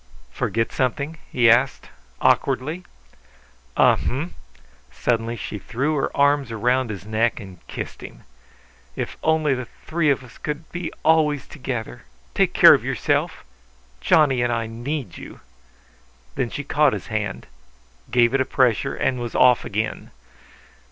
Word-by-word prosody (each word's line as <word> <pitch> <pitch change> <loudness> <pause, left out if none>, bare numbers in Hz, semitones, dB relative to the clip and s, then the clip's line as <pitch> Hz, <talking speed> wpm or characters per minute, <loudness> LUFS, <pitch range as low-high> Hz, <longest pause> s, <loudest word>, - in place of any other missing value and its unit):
"Forget 115 0 -1
something?" 140 +5 -2
he 120 -1 +3
asked, 125 +4 +3 0.3
awkwardly. 155 +8 +1 0.9
"Uh - - +5
hm!" 150 +7 -3 0.6
Suddenly 115 -1 -1
she 105 -2 -6
threw 135 +10 -2
her 140 - 0
arms 140 -2 +3
round 125 +2 +1
his 100 -2 -6
neck 110 +3 0
and 95 -5 -11
kissed - - -7
him. - - -11 0.7
"If - - -4
only 155 -2 +2
the 130 -2 -4 0.2
three 160 -2 +1
of 135 -2 +1
us 120 - -15
could 150 +1 -5
be 175 -1 -4
always 155 -3 +3
together! 125 - -6 0.3
Take - - +1
care - - +9
of - - +1
yourself. - - -1 0.6
Johnny 135 - +3
and 120 0 +1
I 115 -1 -1
need 120 - -5
you." - - -11 0.9
Then 120 - -2
she 145 - -5
caught 150 -1 +2
his - - -5
hand, 105 -3 -3 0.6
gave 120 0 +3
it 135 - +3
a - - +4
pressure, 130 0 +1
and 130 -1 0
was 120 -1 -5
off 125 -1 +5
again. 110 +2 -3
130 Hz, 145 wpm, -22 LUFS, 115-145 Hz, 0.9 s, care